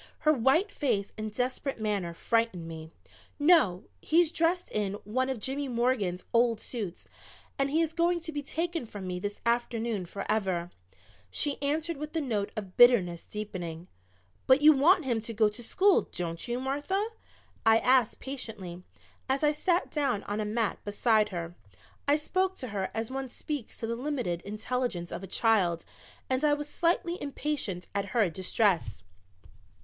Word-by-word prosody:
Her 305 - +5
white 290 - +3
face 210 - -1
and 215 0 -4
desperate 255 +3 -2
manner 200 -6 -1
frightened 225 -6 0
me. 160 -1 -8 0.5
"No, 290 - +4 0.2
he's 330 0 +3
dressed 340 +2 +1
in 205 -2 -1
one 255 +5 -1
of 260 -3 -2
Jimmy 275 +6 -2
Morgan's 235 -7 0
old 230 -1 +3
suits 210 -9 -5 0.5
and 275 0 +2
he 315 +4 +2
is 325 0 -2
going 345 +1 +2
to 325 0 -5
be 290 -1 -3
taken 330 -1 -3
from 205 -3 -7
me 180 -1 -3
this 205 +2 -5
afternoon 235 -4 0
forever," 190 -3 -1 0.6
she 285 - 0
answered 305 +3 0
with 300 +2 -6
the 325 - +1
note 220 -9 -1
of 195 -4 -6
bitterness 195 -9 +6
deepening. 180 -5 -6 0.6
"But 260 +2 +6
you 310 +1 +9
want 325 +4 +4
him 240 -4 +1
to 230 +1 -6
go 215 0 +4
to 210 +4 -8
school, 380 - +3
don't 170 +1 -3
you, 240 +1 -1
Martha?" 290 - -1 0.5
I 225 0 +6
asked 250 -1 +3
patiently, 215 -10 -6 0.5
as 270 +3 +1
I 295 - +5
sat 345 +4 0
down 275 -9 0
on 205 +1 -3
a 215 - -1
mat 215 0 -1
beside 215 +1 +2
her. 170 -3 -5 0.5
I 285 - +5
spoke 370 +5 0
to 255 - -6
her 195 -2 -2
as 225 +2 -3
one 270 -1 -4
speaks 285 -1 -5
to - - -4
the 230 +1 -2
limited 245 - -2
intelligence 215 -3 -3
of - - -5
a 195 - -7
child 185 -5 +2 0.4
and 260 +2 0
I 295 -1 +4
was 295 0 -5
slightly 345 +2 0
impatient 280 -10 -3
at 200 0 0
her 205 -7 +3
distress. 180 - 0
235 Hz, 165 wpm, -29 LUFS, 200-290 Hz, 0.6 s, you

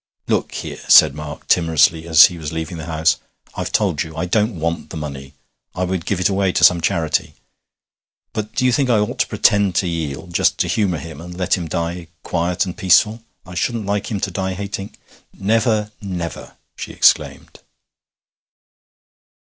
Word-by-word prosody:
'Look - - -1
here,' - - -6
said 75 -3 +7
Mark 75 0 -8
timorously 80 -1 +3
as 80 -1 +8
he 90 -2 -3
was 75 -2 -5
leaving 80 +1 -5
the 80 0 -7
house, 80 +1 +1 0.4
'I've - - -4
told 75 - +1
you 80 -2 -6
I 85 - -1
don't 105 +2 0
want 85 +1 -3
the - - -7
money 70 -2 -7 0.4
I 95 - -1
would 90 -2 -3
give 100 - 0
it 90 - +3
away 95 -1 +1
to - - 0
some 85 -1 +6
charity; 80 -1 -1 1.0
but 110 -1 -5
do 125 - +1
you 125 - +4
think 135 0 +1
I 115 - +4
ought 105 0 -2
to - - +2
pretend 100 -3 +2
to 90 - +1
yield, 85 0 -4
just - - +2
to - - 0
humour 95 -6 0
him, 80 0 -9
and 90 +1 -9
let 90 0 +1
him 85 -3 -5
die 85 +1 -3 0.2
quiet 85 +3 -1
and 90 - -6
peaceful? 105 +3 +3 0.2
I 90 - -11
shouldn't 115 +4 -2
like 100 0 -2
him 105 -4 -2
to 95 - -2
die 95 +1 -3
hating 100 0 -6 0.2
' - - -34
'Never 110 +1 +1
never!' 90 -4 -6 0.2
she - - -7
exclaimed. - - +1
90 Hz, 185 wpm, -19 LUFS, 80-100 Hz, 1.0 s, as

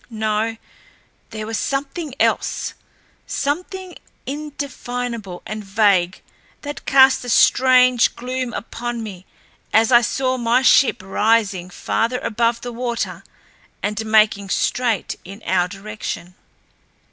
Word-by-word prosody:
No, 220 0 -1 0.7
there 215 -1 -6
was 225 0 -3
something 280 +1 -3
else, - - 0 0.5
something 360 +6 -3 0.3
indefinable 245 -8 -5
and 215 +2 -5
vague 195 -3 +2 0.4
that 290 0 -7
cast 265 -1 +6
a 245 - -6
strange 255 0 +5
gloom 255 0 -3
upon 235 0 -5
me 190 -4 -9 0.4
as 225 +2 +4
I 240 -1 +7
saw 255 +1 0
my 240 +2 +2
ship 250 -5 +4
rising 200 -2 +1
farther 230 +6 -1
above 230 +1 0
the 245 -1 -6
water 235 0 -3 0.6
and 210 +2 -1
making 215 -2 +3
straight 235 0 0
in 195 +4 -11
our 180 -1 +2
direction. 200 -2 -6
230 Hz, 110 wpm, -20 LUFS, 210-255 Hz, 0.7 s, I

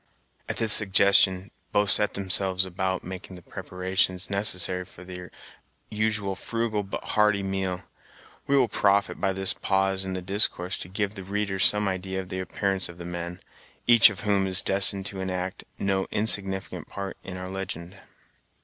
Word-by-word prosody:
At - - -3
this 110 -2 +6
suggestion, 100 -1 +4 0.2
both 105 -1 +5
set 105 - +6
themselves 95 -1 +1
about 95 0 -4
making 95 +1 -9
the 90 - -14
preparations 95 +1 -3
necessary 95 -2 +1
for 90 0 -16
their 90 -1 -10 0.6
usual 105 -2 -2
frugal 115 +1 -3
but 100 -1 -7
hearty 105 -2 +1
meal. 95 -1 -4 0.6
We 140 - +2
will 130 -3 +3
profit 100 -1 0
by 95 - 0
this 95 0 +2
pause 95 0 -1
in 95 0 -5
the 95 - -5
discourse 95 -2 0
to - - -8
give 100 +1 -3
the 100 -3 -9
reader 100 0 -4
some 105 +2 +6
idea 95 0 -4
of 95 -1 -8
the 95 - -5
appearance 95 0 -2
of 85 - -12
the 85 - -10
men, 85 +1 -7 0.4
each 120 -1 +7
of 95 -5 -8
whom 100 -2 0
is 95 0 -1
destined 95 0 +3
to 95 -1 -5
enact 95 0 -5
no 95 -1 -2
insignificant 100 -3 0
part 100 -1 -7
in 95 -1 -8
our 90 0 -8
legend. 95 -2 -7
95 Hz, 165 wpm, -25 LUFS, 95-100 Hz, 0.6 s, each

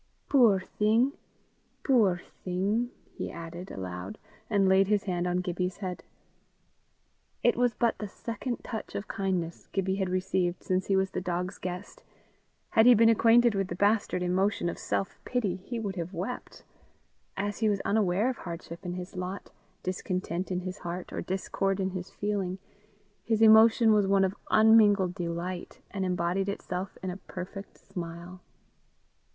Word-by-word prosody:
"Puir 235 -8 +6
thing! 220 +7 +2 0.7
puir 215 -10 +4 0.2
thing!" 200 +6 0 0.2
he - - -5
added 170 +2 -8
aloud, 90 0 -6 0.3
and 200 -3 +3
laid 190 0 +5
his 205 -1 +2
hand 180 -2 -1
on 180 0 +1
Gibbie's 180 0 -2
head. 185 -3 -5 1.4
It 240 - +4
was 245 -2 +2
but 235 -2 +1
the 210 - -4
second 230 +4 -5
touch 220 - -6
of 200 - -4
kindness 180 -4 -2
Gibbie 190 0 0
had 190 -2 -1
received 185 -1 0
since 185 0 0
he 195 - +2
was 190 0 +1
the - - -3
dog's 180 +2 -3
guest: 180 +2 -6 0.7
had 220 +2 +5
he 250 - +9
been 230 +1 +6
acquainted 230 +1 +5
with 195 -1 0
the 175 - -4
bastard 200 -1 +2
emotion 185 0 +1
of - - -6
self 195 - -2
pity, 215 -8 -1
he 230 +6 -5
would 200 -4 -4
have 175 +2 -4
wept; 205 +9 -5 0.7
as 205 +1 -2
he 220 -2 +3
was 200 -1 +1
unaware 205 0 +2
of 260 -2 -1
hardship 170 -1 -8
in 175 - -4
his 180 +2 -7
lot, 185 +2 -5 0.3
discontent 185 -1 -3
in 180 0 -1
his 185 +2 -6
heart, 175 +1 -6
or - - -2
discord 195 +1 -1
in 190 0 0
his 185 0 -5
feeling, 200 -3 -2 0.7
his 225 -2 +1
emotion 220 0 +7
was 205 -2 +3
one 195 0 +4
of 190 +1 -2
unmingled 210 -4 +5
delight, 175 +1 -4
and 195 - -2
embodied 180 +2 0
itself 190 -1 -4
in 185 - -2
a 180 - -6
perfect 195 +1 -8
smile. 175 +1 -8
190 Hz, 160 wpm, -29 LUFS, 180-210 Hz, 1.4 s, he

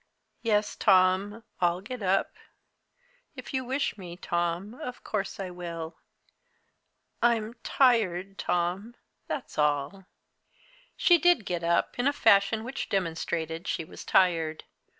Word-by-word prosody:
"Yes, 210 -2 +1
Tom, 195 +3 +3 0.2
I'll 175 0 +2
get 235 +5 -7
up. 195 0 +1 1.0
If - - -9
you 260 -1 0
wish 260 -4 -2
me, 175 -2 -8
Tom, 175 +3 -2
of 250 -2 -8
course 200 -2 -3
I 190 -2 -4
will. 170 -2 -7 1.2
I'm 230 -2 +2
tired, 195 -7 +2
Tom 180 +7 -1 0.3
that's - - -5
all." 150 +6 0 0.9
She 345 -1 +5
did 350 - +4
get 175 -3 -3
up, 170 +7 +1
in 245 - +2
a 285 - +3
fashion 220 -2 +4
which 255 +3 -5
demonstrated 165 -2 -2
she 165 - -2
was - - -10
tired. 165 -4 +2
195 Hz, 125 wpm, -28 LUFS, 175-225 Hz, 1.2 s, She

